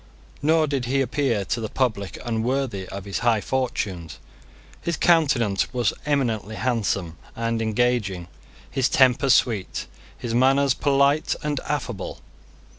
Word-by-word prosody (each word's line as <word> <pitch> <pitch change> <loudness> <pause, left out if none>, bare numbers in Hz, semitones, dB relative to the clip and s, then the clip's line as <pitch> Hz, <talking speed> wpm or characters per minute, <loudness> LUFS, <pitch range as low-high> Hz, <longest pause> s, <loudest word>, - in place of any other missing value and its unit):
Nor 160 +2 +3
did 140 -4 -2
he 135 +3 +1
appear 130 -5 0
to 115 - -2
the 110 - -3
public 105 -7 -1
unworthy 115 -3 -1
of 100 0 -7
his 100 - -3
high 115 -2 +2
fortunes. 100 - -3 0.6
His 170 -3 -2
countenance 140 - +2
was 120 -4 +1
eminently 115 -8 0
handsome 100 - -1 0.2
and 115 0 -1
engaging, 110 -5 0 0.4
his 135 -1 +1
temper 135 -2 +4
sweet, 115 -6 +2 0.3
his 120 -2 -4
manners 135 +2 +4
polite 140 +1 +2
and 150 -2 -1
affable. 140 -7 -3
120 Hz, 125 wpm, -24 LUFS, 105-140 Hz, 0.6 s, temper